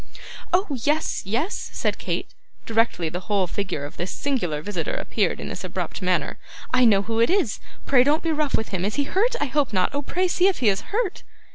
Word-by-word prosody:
'Oh! 370 +3 +3 0.2
yes, 300 +2 +1
yes,' 265 - -1
said - - -1
Kate, - - -3 0.3
directly 225 -7 +1
the 175 +3 -3
whole 200 -3 +3
figure 180 -5 -3
of 145 - -10
this 175 +2 -3
singular 180 - -1
visitor 205 - -2
appeared - - 0
in - - -5
this - - -5
abrupt - - -4
manner. - - 0 0.3
'I 255 -1 +5
know 205 -4 +5
who 225 +2 -1
it 230 - +4
is. 365 - +1 0.3
Pray 255 -3 +5
don't 295 +4 +2
be 330 - +1
rough 305 -2 +1
with 220 - -3
him. 185 -2 -2
Is 205 +2 -1
he 285 - +2
hurt? 430 - +1
I - - +1
hope 290 -2 +1
not. 185 +2 +1
Oh, 285 - 0
pray 365 +6 0
see 360 +1 +3
if 390 - +2
he 235 - +3
is 195 0 +1
hurt. 415 -2 -1
250 Hz, 220 wpm, -24 LUFS, 200-320 Hz, 0.3 s, I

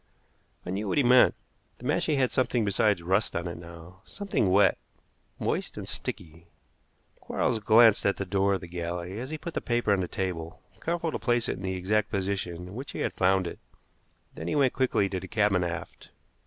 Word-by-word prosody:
I 90 - -4
knew 100 +3 -2
what - - 0
he 145 - +5
meant. 125 +1 +6 0.4
The 125 - -12
mashie 150 +2 +1
had 130 -2 +2
something 125 -3 +1
besides 100 -2 +2
rust 95 +5 +1
on 85 +1 -2
it 85 - -5
now, 85 +2 -12
something 200 - -1
wet, 95 +1 +4 0.6
moist - - -2
and - - -6
sticky. 85 +1 -6 0.7
Quarles 120 -3 -1
glanced 110 0 +6
at 100 - +1
the 95 - -3
door 100 +1 +2
of 95 - -5
the 90 - -8
galley 85 +3 -4
as 130 +2 -5
he 155 - -4
put 170 +2 -7
the - - -2
paper 120 -3 +1
on 100 - +1
the 90 - -2
table, 85 -4 -4 0.2
careful 170 -1 -1
to - - -3
place 120 -1 +1
it - - -2
in - - -9
the 95 0 -2
exact 105 +4 0
position 95 -3 -2
in - - -10
which 130 +5 -7
he - - -4
had - - -1
found 95 0 +2
it; 85 - -6 0.7
then 80 - -7
he - - -1
went 135 -3 +3
quickly 130 -6 +2
to 95 -1 -3
the 95 - -8
cabin 105 -4 +2
aft. 85 -1 -6
100 Hz, 210 wpm, -28 LUFS, 90-120 Hz, 0.7 s, meant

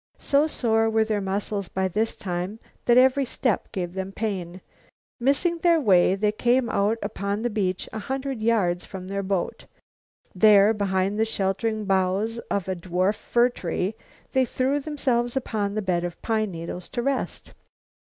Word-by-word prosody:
So 290 +2 +2
sore 225 -6 +1
were 220 0 +3
their 215 -2 -1
muscles 200 0 -2
by 190 0 0
this 215 +5 -1
time 180 +2 -4 0.3
that 240 0 +5
every 260 +2 +5
step 245 -4 -1
gave 175 -2 -4
them 190 0 -4
pain. 190 -4 -4 0.6
Missing 285 +7 +1
their 340 -1 +4
way, 190 - +4
they 210 +1 +1
came 240 +3 +1
out 205 +3 +1
upon 200 +1 -3
the 240 - 0
beach 190 -4 -1
a 220 - -3
hundred 265 +1 -4
yards 200 -6 +1
from 185 -1 -8
their 200 0 -2
boat. 190 -2 -2 0.7
There, 205 +2 +6
behind 200 0 0
the - - +4
sheltering 215 +1 -1
boughs 195 +4 +1
of 200 -3 -1
a 190 - -1
dwarf 185 +3 0
fir 240 +3 +2
tree 185 -2 -3 0.4
they 260 -1 +3
threw 260 +3 0
themselves 265 -4 -1
upon 210 -5 -2
the 215 - -1
bed 175 -2 0
of 175 -1 -5
pine 215 -2 0
needles 170 0 -7
to 240 - -3
rest. 275 0 -2
210 Hz, 165 wpm, -25 LUFS, 190-240 Hz, 0.7 s, There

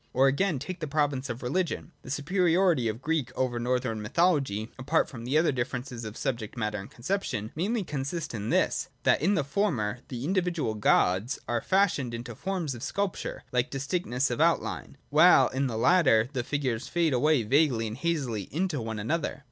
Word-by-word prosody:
Or 135 +2 +4
again, 155 +4 +1
take 185 +7 -6
the 155 - -3
province 140 -2 0
of 120 +1 -5
Religion. 175 +5 -2
The - - -11
superiority 170 -1 +2
of 110 +4 -4
Greek 150 -5 0
over 125 -2 0
Northern 125 -2 -1
mythology 130 - +1
(apart 145 +5 +1
from 120 -3 -8
other 155 +4 +3
differences 125 -2 -4
of 110 +1 -7
subject 120 -4 -3
matter 105 -2 -2
and 100 - -9
conception) 120 - -3
mainly 205 +7 -1
consists 145 0 -4
in 105 -1 -4
this: - - +1
that - - +3
in 195 +6 +3
the 180 - +1
former 135 - -1
the 125 0 -5
individual 175 - 0
gods 105 +1 +2
are 120 -1 0
fashioned 170 -11 +1
into 120 0 -6
forms 180 - -3
of 120 - -9
sculpture 200 +7 -3
like 125 0 +1
distinctness 135 -2 -1
of 120 - -1
outline, - - 0
while - - +6
in 135 +1 -1
the 115 -3 -3
latter 120 -6 +4
the 125 -3 -1
figures 130 -3 -2
fade 170 -4 +1
away 140 0 +3
vaguely 130 -1 +2
and 110 +1 -5
hazily 135 - -2
into 165 -3 -1
one 110 -1 -4
another. 140 +7 -2
135 Hz, 180 wpm, -28 LUFS, 120-165 Hz, -, while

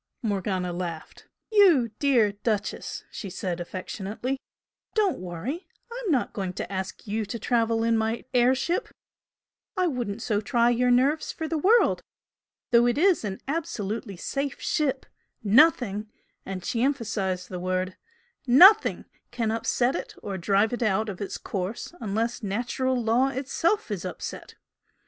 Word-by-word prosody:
Morgana 190 -4 -1
laughed. 170 -2 -6 0.2
"You 345 - +5
dear 245 -8 +4
Duchess!" 205 0 -3
she 200 - -6
said, 180 -1 -3
affectionately 200 +8 -4 0.6
"Don't 415 -5 +2
worry! 185 - -5 0.2
I'm 475 -5 -3
not 265 -5 +1
going 190 -3 -3
to 185 - -5
ask 190 0 -5
you 215 +1 -1
to 205 +4 -5
travel 230 0 +1
in 230 0 +3
my 220 +1 -2
air 250 +1 +4
ship 340 - -1 0.9
I 365 - +3
wouldn't 240 - -2
so 210 -2 0
try 240 +1 +2
your 250 +1 +2
nerves 270 +6 +2
for 320 - -5
the 320 -1 -1
world! 445 +9 +4 0.7
Though 240 0 +6
it 240 - +1
is 365 -1 +4
an 195 -2 -4
absolutely 220 - -3
safe 275 +8 -3
ship, 275 -3 0 0.4
nothing" 220 -3 +4 0.4
and 190 -2 -5
she 235 -3 -1
emphasised 205 -9 -1
the 180 - -5
word 185 +1 -2 0.5
"NOTHING 375 - +7 0.2
can 230 -3 -1
upset 240 +3 +1
it - - -5
or 200 -2 -4
drive 200 +5 +2
it 245 - -3
out 215 0 +1
of 195 0 -7
its 200 - -4
course 195 - -4
unless 225 +3 -1
natural 245 +5 -1
law 235 +3 +3
is 270 - -4
itself 335 +10 0
upset! - - -7
230 Hz, 145 wpm, -26 LUFS, 200-270 Hz, 0.9 s, NOTHING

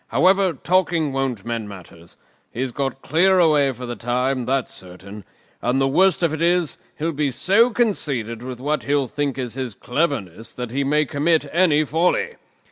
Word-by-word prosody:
"However, 190 -1 +3
talking 170 -5 0
won't 130 -7 -2
mend 115 -3 -4
matters. 85 -3 -13 0.3
He's 130 +1 -3
got 135 +1 -4
clear 185 +4 +3
away 150 -5 +4
for 125 0 -8
the 120 0 -5
time, 125 +2 -1
that's 135 -1 -1
certain; 95 +2 -11 0.4
and 125 +2 +1
the 135 - +2
worst 180 +5 +3
of 165 -2 +2
it 155 - -4
is, 175 -1 +1 0.2
he'll 160 +2 -1
be 150 -2 -1
so 200 - +3
conceited 140 - -1
with 125 -1 -7
what 150 +3 -1
he'll 140 -1 0
think 145 0 -2
is 125 -3 -4
his 130 -5 -5
cleverness 120 - -3
that 125 -2 -5
he 140 +3 -1
may 150 +2 +2
commit 155 +2 +1
any 160 -4 +4
folly. 180 - 0
140 Hz, 175 wpm, -21 LUFS, 125-165 Hz, 0.4 s, away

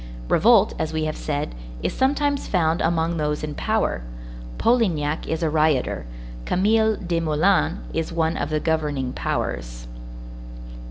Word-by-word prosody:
Revolt, 215 -1 +5
as 155 - -1
we 160 0 -1
have 155 0 -2
said, 145 - -3 0.3
is - - -1
sometimes 285 +1 +1
found 165 -3 +1
among 165 0 +1
those 150 -1 -1
in 150 -1 -3
power. 215 - 0 0.6
Polignac 170 -11 +1
is 160 +1 -2
a 160 - +2
rioter; 155 - +1 0.4
Camille 220 - +2
Desmoulins 170 0 +1 0.2
is 165 0 -2
one 165 -1 0
of - - -2
the 155 0 0
governing 150 -5 -1
powers. - - -3
160 Hz, 130 wpm, -23 LUFS, 150-200 Hz, 0.6 s, Revolt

